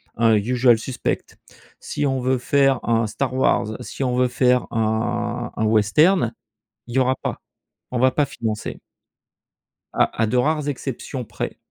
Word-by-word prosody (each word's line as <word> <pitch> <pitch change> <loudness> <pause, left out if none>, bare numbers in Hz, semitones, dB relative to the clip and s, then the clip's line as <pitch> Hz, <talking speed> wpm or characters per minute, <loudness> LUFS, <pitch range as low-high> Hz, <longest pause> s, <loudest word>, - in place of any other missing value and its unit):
un 115 -1 +4
«Usual 120 +3 +3
Suspects», 125 +2 -4 0.4
si - - -3
on 135 -1 0
veut 130 +1 +1
faire 135 0 +2
un 115 -1 +1
«Star 130 +4 -3
Wars», 110 -4 +1
si - - -5
on 125 -1 0
veut 125 0 +3
faire 125 0 +2
un 120 +2 -1
un 110 - 0
western, 115 - +3 0.5
il 120 - -8
y 135 - +2
aura 130 0 +2
pas. - - -5 0.5
On 125 - -2
va 130 +1 +4
pas 145 - +1
financer. 110 -4 -4 1.1
À - - +1
à - - +2
de 125 +3 0
rares 150 +3 +1
exceptions 130 -1 -5
près. - - -5
125 Hz, 160 wpm, -22 LUFS, 115-130 Hz, 1.1 s, un